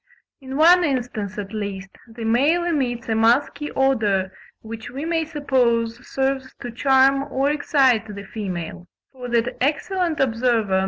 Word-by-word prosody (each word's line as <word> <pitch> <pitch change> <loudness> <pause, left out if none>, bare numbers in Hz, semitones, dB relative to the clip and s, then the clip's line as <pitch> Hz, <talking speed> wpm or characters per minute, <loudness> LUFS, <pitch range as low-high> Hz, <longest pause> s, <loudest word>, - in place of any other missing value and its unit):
In 265 -1 -6
one 350 +3 +6
instance, 245 - -2
at 205 0 -6
least, 195 -2 -5 0.2
the 230 0 -9
male 285 +10 +2
emits 260 -9 -1
a 225 - 0
musky 270 +6 +2
odour, 210 -8 +1 0.3
which 225 0 -8
we 275 +5 -6
may 330 -1 0
suppose 245 -6 0
serves 265 0 -2
to 245 - -6
charm 270 +2 +3
or 275 +2 +1
excite 265 -6 +2
the 200 - -7
female; 180 -4 -6 0.2
for 250 -2 -8
that 235 0 0
excellent 330 +3 -1
observer, 230 -4 0
Mr. 235 -4 +1
Ramsay - - -5
(1. 190 - +3
250 Hz, 160 wpm, -22 LUFS, 225-280 Hz, 0.3 s, one